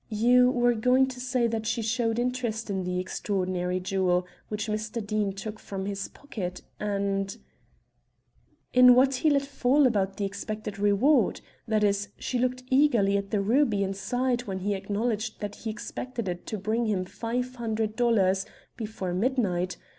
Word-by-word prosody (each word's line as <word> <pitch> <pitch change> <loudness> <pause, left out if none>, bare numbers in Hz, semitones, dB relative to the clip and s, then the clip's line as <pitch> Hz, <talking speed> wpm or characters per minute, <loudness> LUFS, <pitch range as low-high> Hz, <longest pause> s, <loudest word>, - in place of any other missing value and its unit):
You 245 +3 +5
were 245 -2 +3
going 250 +4 +4
to 255 -1 -8
say 250 -1 +1
she 225 +1 -1
showed 225 0 0
interest 240 -3 -2
in 190 -2 -2
the 180 0 -2
extraordinary 185 -1 -1
jewel 185 -1 +1 0.2
which 210 0 -3
Mr. 215 +1 -3
Deane 210 -1 0
took 210 +3 -7
from 195 -1 -5
his 200 0 -3
pocket 185 -10 -6 0.2
and 200 -1 -1 0.7
" - - -41
"In 250 0 +8
what 265 +2 +5
he 290 +4 +2
let 280 -1 +3
fall 275 0 +2
about 195 -5 +1
the 205 - -1
expected 210 0 -5
reward. 205 +5 +3 0.3
That 215 -1 +2
is, 205 0 +1
she 250 - -2
looked 255 +1 0
eagerly 240 -8 +4
at 200 0 -1
the 205 -1 +1
ruby 220 -1 +2
and 195 0 -2
sighed 245 +4 -1
when 190 -2 -4
he 205 +2 0
acknowledged 215 +3 -2
that 205 -1 -4
he 225 - -5
expected 235 +1 -5
it 175 -1 -5
to 215 - -3
bring 220 +4 -1
him 190 -4 0
five 245 +6 -3
hundred 220 -2 -2
dollars 195 -6 +2 0.3
before 210 -5 -4
midnight. 185 -5 0
215 Hz, 165 wpm, -27 LUFS, 195-245 Hz, 0.7 s, In